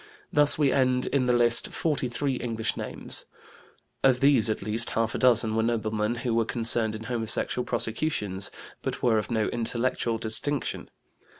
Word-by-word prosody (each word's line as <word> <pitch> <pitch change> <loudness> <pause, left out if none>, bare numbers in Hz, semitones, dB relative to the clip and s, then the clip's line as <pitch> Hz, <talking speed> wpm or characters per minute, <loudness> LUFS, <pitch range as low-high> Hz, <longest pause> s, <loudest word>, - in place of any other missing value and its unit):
Thus 145 0 +4
we 145 -3 +3
end 130 -1 +1
in 130 -3 0
the - - +3
list 120 -1 +4
43 135 -3 -1
English 115 -2 -2
names; - - -3 0.8
of 130 -2 +4
these 135 -6 +4
at 110 - -2
least 110 +3 0
half 115 0 0
a - - -3
dozen 115 -3 +3
were 110 - +2
noblemen 110 -1 -1
who 120 - 0
were 115 0 +2
concerned 115 -1 +2
in 110 - -7
homosexual 115 +1 -2
prosecutions, 105 -7 -2 0.3
but - - -5
were 115 -3 +3
of 105 - -5
no 110 -3 0
intellectual 120 0 -1
distinction. 115 +6 -1
115 Hz, 160 wpm, -26 LUFS, 110-125 Hz, 0.8 s, Thus